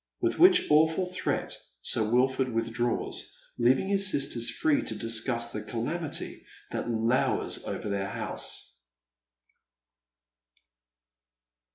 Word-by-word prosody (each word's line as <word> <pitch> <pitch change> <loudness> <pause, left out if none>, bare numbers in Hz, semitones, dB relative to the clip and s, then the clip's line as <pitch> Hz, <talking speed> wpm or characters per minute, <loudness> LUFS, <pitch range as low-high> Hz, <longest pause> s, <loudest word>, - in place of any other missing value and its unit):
With - - -1
which 360 0 +7
awful 160 +4 +4
threat 180 0 -3 0.3
Sir - - +1
Wilford 130 +3 +1
withdraws, 115 +1 -2 0.2
leaving 130 +8 +3
his 195 -1 +4
sisters 135 -7 +2
fi'ee 155 -2 +1
to 110 - -2
discuss 115 +2 +1
tlae 105 0 -6
calamity 145 +8 -3 0.3
that - - -3
lowers 115 +2 0
over - - -5
their 100 -1 -2
house. - - -5
120 Hz, 100 wpm, -28 LUFS, 115-155 Hz, 0.3 s, which